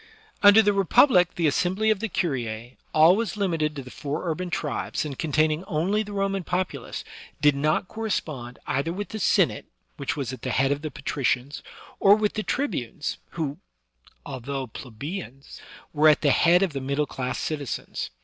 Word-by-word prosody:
Under 205 +2 +8
the 205 0 +3
Republic 195 - +4
the 170 - 0
assembly 185 +8 +2
of 215 - +1
the 225 - -2
curia^ 120 - -3 0.2
always 185 +9 +4
limited 165 -6 0
to 140 - -5
the 125 - -11
four 150 +5 -4
urban 175 +2 -2
tribes, 175 - -2
and 140 -3 -6
containing 155 +1 +1
only 190 +6 0
the 210 -1 -6
Roman 195 -1 -1
populace, 175 -7 -3 0.4
did 145 0 +5
not 155 +5 +1
correspond 155 - -4
either 140 +5 -1
with 205 +4 -5
the 220 - -5
Sen - - +4
ate, - - -9 0.3
which 140 - -2
was 130 -3 -3
at 130 - -8
the 130 - -3
head 135 +2 +2
of 145 0 -1
the 155 - -4
patricians, 135 -1 -2 0.4
or 200 +1 +7
with 210 -1 0
the 215 - -2
tribunes, 210 - -3
who, 155 -2 -3 0.7
although 135 0 -4
plebeians, 135 - -8 0.3
were 155 +1 +6
at 150 - +4
the 145 - +4
head 175 +6 +5
of 180 -6 -1
the 135 - -3
middle 140 +3 0
class 125 -3 -4
citizens. 145 -5 -4
155 Hz, 175 wpm, -25 LUFS, 140-190 Hz, 0.7 s, Under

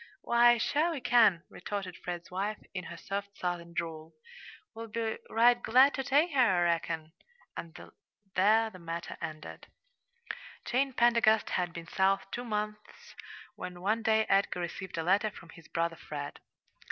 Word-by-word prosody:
"Why, 240 0 +5
sure 300 +8 +1
we 325 -4 -3
can," 220 -9 +4
retorted. 190 -1 -5
Fred's 175 -1 -7
wife, 200 +3 -2 0.2
in 180 -1 -5
her - - -8
soft 200 0 -5
Southern 175 -1 -3
drawl. 165 -2 -5 0.6
"We'll 230 0 -7
be 225 0 -3
right 240 +1 +4
glad 260 +5 +5
to 270 - -2
take 290 +6 +3
her, 280 - 0
I 190 -8 +4
reckon." 165 -2 -1 0.4
And 170 +1 -8 0.5
there 220 +4 +4
the 185 - -12
matter 170 0 -5
ended. 155 0 -7 1.0
Jane 265 +2 +1
Pendergast 235 -2 +3
had 180 -1 0
been 170 -1 -8
South 190 +3 +1
two 245 - -4
months, 210 -2 -5 0.4
when 180 -1 -7
one 215 +4 +1
day 220 -1 +3
Edgar 195 -2 +2
received 175 +1 -5
a 165 - -1
letter 200 +5 +2
from 170 -5 -14
his 165 -1 -14
brother 165 0 -1
Fred. 145 -1 -7
200 Hz, 155 wpm, -30 LUFS, 170-230 Hz, 1.0 s, Why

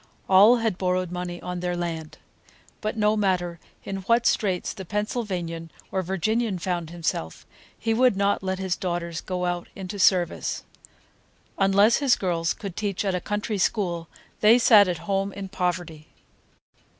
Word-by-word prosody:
All 200 +5 +7
had 225 -5 -1
borrowed 185 -1 0
money 180 -1 -4
on 180 0 -4
their 175 0 -2
land. 165 -3 -4 0.6
But 215 +1 -3
no 210 0 +3
matter 180 -4 0 0.2
in 195 - -4
what 230 +5 +1
straits 190 -4 +1
the 190 - -8
Pennsylvanian 185 -5 -3 0.2
or 190 - 0
Virginian 195 +4 -1
found 175 -2 -3
himself, 165 - -4 0.3
he 225 0 0
would 245 -3 +3
not 200 0 +1
let 190 0 -2
his 190 -1 -1
daughters 175 -2 -3
go 180 -1 -3
out 175 -1 -2
into 195 +1 -6
service. 180 -3 +2 1.0
Unless 200 +3 +5
his 275 -3 +3
girls 170 -3 -1
could 195 -5 -7
teach 205 -3 -2
a 185 -2 0
country 210 +1 -2
school, 175 -4 0 0.3
they 220 +3 +6
sat 215 -4 +7
at 180 -2 -1
home 195 +1 0
in 195 -1 -6
poverty. 175 -4 -3
190 Hz, 150 wpm, -25 LUFS, 175-205 Hz, 1.0 s, All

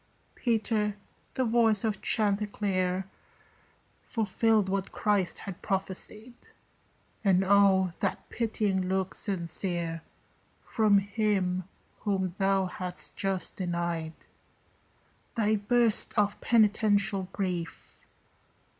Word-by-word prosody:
Peter, 220 -3 0 0.4
the 260 - +1
voice 225 -3 +3
of 220 -2 -1
chanticleer 200 -3 0 1.0
Fulfilled 220 -2 +1
what 195 0 -2
Christ 195 -5 0
had 195 -3 -8
prophesied; 200 +4 -3 0.9
And 190 -2 +4
oh, 190 -2 +4
that 195 - -2
pitying 205 -5 -1
look 190 0 -1
sincere 170 -3 -1 0.6
From 215 -3 +3
him 195 -3 0 0.3
whom 195 -3 -1
thou 195 0 +2
hadst 180 0 -3
just 195 -2 -1
denied! 170 -3 -2 1.2
Thy 215 -1 +2
burst 230 +2 +2
of 205 -1 +1
penitential 205 -4 +2
grief! 180 -6 -5
195 Hz, 90 wpm, -28 LUFS, 185-215 Hz, 1.2 s, And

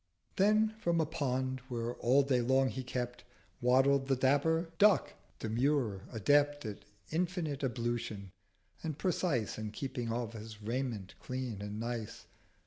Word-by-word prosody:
Then 215 +2 +4
from 170 -5 +1
a 160 - +3
Pond, 130 -3 -1
where 120 -1 -2
all 130 +4 +4
day 130 -2 +2
long 130 +2 +3
he 130 - -4
kept, 125 -1 -4 0.4
Waddled 135 +2 +4
the 135 - +3
dapper 160 +6 +2
Duck 210 -1 +5 0.2
demure, 115 -3 0
adept 145 +6 +3
460 110 - -3
At 105 +1 -16
infinite 165 -6 -2
Ablution, 120 -5 -2 0.5
and 155 -3 -3
precise 160 - 0
In 110 -1 -3
keeping 120 +1 -4
of 115 -1 -2
his 110 -1 -8
Raiment 115 -3 -3
clean 125 -5 -4
and 105 +1 -5
nice. 115 -2 -4
130 Hz, 140 wpm, -33 LUFS, 115-145 Hz, 0.5 s, Duck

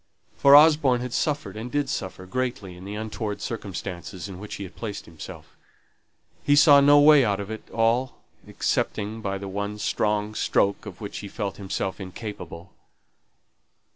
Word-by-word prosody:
for 140 0 +7
Osborne 150 -5 +6
had 125 -1 -5
suffered, 150 -2 -1
and 115 +3 -6
did 145 -1 0
suffer, 95 -2 -5
greatly 105 -3 -3
in 90 +1 -11
the 100 +1 -6
untoward 110 -1 -4
circumstances 95 -3 -6
in 95 -2 -9
which 105 +1 -7
he 100 - -6
had 95 - -10
placed 105 -3 -6
himself. 80 -2 -11 0.9
He 145 - +3
saw 145 -1 +7
no 145 +1 +7
way 145 -1 +7
out 100 -3 0
of 100 +1 -6
it 110 - -8
all, 115 +3 +1 0.3
excepting 110 +2 -2
by 100 -2 -2
the 100 0 -7
one 100 +2 -4
strong 105 0 -1
stroke 100 0 0
of 95 -1 -10
which 100 - -6
he 105 - -7
felt 100 -1 -4
himself 95 -1 -3
incapable. 95 -2 -8
105 Hz, 165 wpm, -25 LUFS, 100-125 Hz, 0.9 s, for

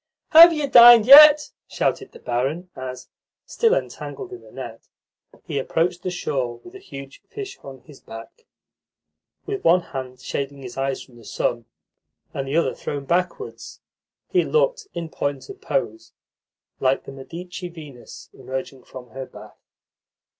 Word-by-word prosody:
"Have 335 +2 +10
you 300 -3 -2
dined 240 -3 +8
yet?" 295 +3 +9 0.2
shouted 405 - -2
the - - -14
barin 140 +9 -3
as, 130 -1 -8 0.4
still 465 +1 +1
entangled 395 -5 -6
in 370 - -10
the - - -17
net, - - -10 0.6
he 145 -5 -3
approached 170 +6 -1
the 185 - -3
shore 135 -9 -3
with 360 - -14
a 390 - -11
huge 135 - -11
fish 405 -2 -8
on 135 -2 -12
his 150 -2 -17
back. 115 - -13 1.0
With 405 -1 -5
one 180 +2 +4
hand 130 -1 -6
shading 140 +1 -5
his 125 -1 -9
eyes 135 0 -3
from 125 -3 -20
the 115 - -16
sun, 120 +2 -3 0.7
and 135 -1 -4
the 140 +4 -1
other 170 - +1
thrown 140 -1 -6
backwards, 180 - -3 0.5
he 365 -2 +3
looked, 485 -2 0
in 170 -1 -4
point 140 -3 -4
of 395 0 -11
pose, 340 -9 -3 0.7
like 130 0 +1
the - - -10
Medici 175 +7 -9
Venus 150 -7 -13
emerging 130 0 -7
from 125 -3 -12
her 130 +1 -7
bath. - - -15
165 Hz, 155 wpm, -22 LUFS, -, 1.0 s, Have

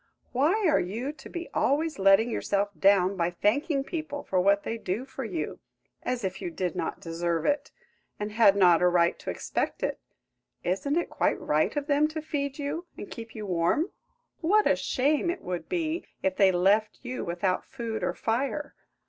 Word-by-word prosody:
Why 335 - +2
are 310 - +4
you 225 +10 -3
to - - -12
be 345 -1 -5
always 310 +2 +1
letting 195 +4 +5
yourself 205 -2 0
down 195 0 +4
by 170 -2 +1
thanking 270 - +1
people 310 -2 -5
for 185 -1 +1
what 200 +2 +3
they 230 - -3
do 210 +6 -3
for 270 0 -6
you, 175 -9 -4 0.4
as 250 -2 -2
if 190 0 -3
you - - -3
did 175 0 -3
not - - -3
deserve 165 -1 -2
it, 285 -1 +1 0.5
and 210 0 -3
had 210 -2 +5
not 180 -4 +5
a 180 - +5
right 175 -1 +3
to - - -6
expect - - -2
it? - - -1 0.6
Isn't 195 - 0
it 345 - -1
quite - - +1
right 155 +6 +1
of 290 -1 -1
them 295 0 +3
to 315 0 -5
feed 280 -3 -3
you 305 +5 -4
and - - -8
keep 225 -1 -8
you 215 -1 -5
warm? 180 - +1 0.5
What 415 +6 +3
a - - +4
shame 290 +6 +1
it 350 - -3
would 180 -1 -4
be 335 -2 -2 0.2
if 190 -1 +1
they 195 -1 +5
left 200 +4 +2
you 255 0 -4
without 180 +2 -1
food 230 -4 -4
or - - -1
fire! 275 +5 -1
225 Hz, 190 wpm, -28 LUFS, 185-290 Hz, 0.6 s, letting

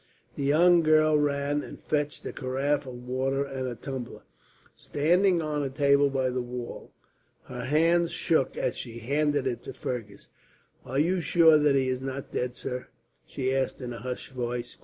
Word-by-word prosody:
The - - -6
young 170 +5 +5
girl 155 -1 +4
ran 145 0 +1
and - - -10
fetched 150 -1 -2
a - - -4
carafe 135 +2 -1
of 125 -1 -9
water 135 +2 0
and 135 -2 -4
a 125 - -4
tumbler, 130 -1 -7 0.5
standing 175 +4 +2
on 150 -1 -1
a 140 - -1
table 140 +1 +3
by 130 -2 0
the 125 0 -1
wall. 120 0 -7 0.5
Her 125 -1 -7
hands 165 +4 +3
shook 160 -5 0
as - - -1
she 115 -2 -7
handed 145 +3 0
it 125 -3 -2
to - - -8
Fergus. 110 -5 -6 0.6
"Are 130 - -3
you 175 +5 +2
sure 165 -2 +5
that 145 -2 +3
he 135 -1 +2
is 130 0 -1
not 135 0 -5
dead, 125 0 -2
sir?" 125 -1 -5 0.4
she 130 0 -1
asked, 135 -1 -1
in 125 -2 -5
a 115 - -7
hushed 125 +3 -6
voice. 120 -1 -4
135 Hz, 180 wpm, -27 LUFS, 125-150 Hz, 0.6 s, young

